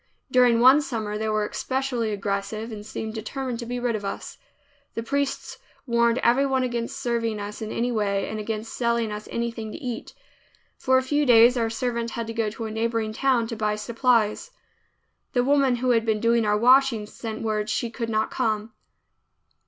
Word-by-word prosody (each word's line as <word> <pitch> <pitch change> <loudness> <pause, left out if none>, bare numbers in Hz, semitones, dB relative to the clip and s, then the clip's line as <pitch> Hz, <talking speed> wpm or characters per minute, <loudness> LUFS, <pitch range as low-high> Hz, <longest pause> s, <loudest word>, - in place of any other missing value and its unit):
During 245 -2 +5
one 260 +4 +7
summer 220 -7 -3
they 220 +1 -2
were 215 -1 +1
especially 260 -4 -2
aggressive 205 +2 -3
and 210 -1 -7
seemed 220 0 -5
determined 240 +2 -4
to 235 - -6
be 245 +1 -3
rid 240 -2 0
of 210 - -4
us. 195 - -6 0.6
The 230 - -3
priests 280 +3 -2 0.3
warned 235 -1 +2
everyone 265 +2 +3
against 240 +1 -3
serving 235 -4 -1
us 205 +1 -6
in 220 - -4
any 245 +1 -1
way, 200 -3 0
and 215 - -4
against 215 +1 -4
selling 235 -2 0
us 210 0 -6
anything 230 -2 -3
to - - -6
eat. 250 -7 -6 0.6
For 260 0 +3
a 260 - +2
few 290 +3 +1
days 240 +1 +7
our 230 -2 0
servant 235 0 -2
had 230 0 -4
to 225 - -5
go 225 -2 0
to 225 +2 -6
a 220 - -4
neighboring 225 0 -1
town 255 -1 +2
to 230 - -4
buy 210 -1 0
supplies. 230 - +1 0.8
The 245 - +3
woman 275 -1 +3
who 250 +1 +1
had 230 -2 +3
been 220 -2 0
doing 230 0 +2
our 210 0 +3
washing 250 -1 +4
sent 220 +1 -7
word 215 -1 -1
she 230 +1 -1
could 230 -1 -4
not 220 0 0
come. 215 0 -1
230 Hz, 190 wpm, -25 LUFS, 215-245 Hz, 0.8 s, one